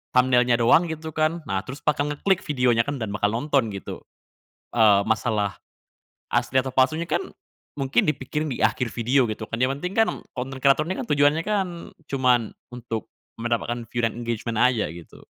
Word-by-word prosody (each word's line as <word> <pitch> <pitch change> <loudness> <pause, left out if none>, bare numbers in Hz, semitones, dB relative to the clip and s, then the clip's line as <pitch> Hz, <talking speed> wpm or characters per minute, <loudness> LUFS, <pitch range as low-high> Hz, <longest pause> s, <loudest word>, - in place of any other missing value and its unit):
thumbnail-nya 125 -1 +4
doang 125 +9 +4
gitu 160 0 -5
kan. 155 +1 0
Nah, 95 -1 -1
terus 135 +3 -8
bakal 145 -1 +1
ngeklik 185 +6 +1
videonya 125 -5 +3
kan 145 - -2
dan 110 -4 -4
bakal 105 0 +1
nonton 130 -2 +1
gitu, 100 -2 -7 0.7
eee, 105 -4 +5
masalah 110 -2 -1 0.7
asli 120 +2 0
atau 130 0 -5
palsunya 155 +6 +2
kan 175 - 0 0.5
mungkin 135 +1 +1
dipikirin 150 0 -2
di 125 - -3
akhir 115 +2 +2
video 120 +2 +1
gitu 110 0 -5
kan 115 - -2
yang 125 - +3
penting 180 +6 -4
kan 225 - +5 0.2
konten 130 +1 -6
kreator 140 +3 +4
ini 185 - -2
kan - - -4
tujuannya 145 +3 +3
kan 205 -2 0 0.4
cuman 125 -4 +1 0.2
untuk 115 -3 -6 0.2
mendapatkan 120 +1 -2
view 120 - -2
dan 115 -1 0
engagement 115 -1 -3
aja 120 -5 +2
gitu. 85 - -13
125 Hz, 170 wpm, -24 LUFS, 115-150 Hz, 0.7 s, eee